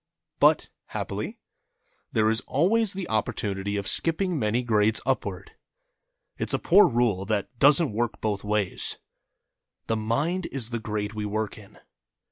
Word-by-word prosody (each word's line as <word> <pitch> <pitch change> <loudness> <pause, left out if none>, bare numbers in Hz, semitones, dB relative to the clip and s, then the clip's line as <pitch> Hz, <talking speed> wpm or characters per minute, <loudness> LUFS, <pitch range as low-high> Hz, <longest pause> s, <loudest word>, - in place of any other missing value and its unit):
But, - - +4 0.2
happily, - - -5 0.7
there 110 0 +2
is 115 +2 +1
always 200 +8 +2
the 190 -2 -5
opportunity 100 -2 -1
of 100 - -3
skipping 165 - +2
many 110 +2 0
grades 110 -2 +3
upward. 100 -8 -2 0.9
It's - - 0
a - - +2
poor 195 +4 +6
rule 115 -6 +1
that 110 +3 -2
doesn't 145 -2 +5
work 115 +1 -2
both 105 -2 -2
ways. 105 -3 -1 0.9
The 115 - -1
Mind 140 +12 -1
is 120 -4 -2
the 120 - -2
Grade 105 -1 -3
we 105 -1 -3
work 110 0 -2
in. 105 -3 -15
110 Hz, 140 wpm, -26 LUFS, 105-140 Hz, 0.9 s, poor